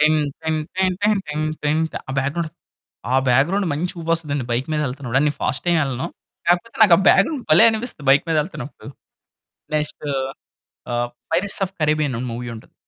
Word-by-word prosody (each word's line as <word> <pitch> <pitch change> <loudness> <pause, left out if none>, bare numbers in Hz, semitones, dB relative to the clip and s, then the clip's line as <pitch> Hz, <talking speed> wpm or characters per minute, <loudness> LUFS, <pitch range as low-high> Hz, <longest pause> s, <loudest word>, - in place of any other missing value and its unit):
టిన్ 155 +1 +4 0.2
టిన్ 160 0 0 0.2
టన్ 185 -1 +2
టన్ 210 -1 +3
టిన్ 150 +1 -2 0.2
టిన్ 150 +1 +2 0.3
ఆ - - -3
back 135 +1 0
ground 170 -2 -2 0.6
ఆహ్, 130 - +4
back 130 +3 +5
ground 195 +1 0
మంచి 165 +5 -2
ఊపొస్తదండి, 160 -5 -1
బైక్ 120 +3 0
మీద 155 - +1
ఎళ్తున్నప్పుడు. 130 -1 -1
నేను 145 - +1
ఫాస్ట్ 140 - -1
ఏమెళ్ళను. 135 -6 0 0.4
కాకపోతే 175 +6 +1
నాకా 185 -6 +8
బ్యాక్ 195 - +7
గ్రౌండ్ 285 -7 -4
భలే 155 - +8
అనిపిస్తుంది 220 - -5
బైక్ 140 +1 +5
మీద 165 - +2
ఎళ్తున్నప్పుడు. 150 -4 -9 0.9
నెక్స్టు 150 0 -2 0.9
ఆహ్, 120 0 0 0.2
'పైరేట్స్ 190 +5 0
ఆఫ్ 185 - -10
కారిబ్బియన్' 150 -4 +1
మూవీ 120 +1 -5
ఉంటది. 110 - -14
155 Hz, 170 wpm, -21 LUFS, 135-175 Hz, 0.9 s, నాకా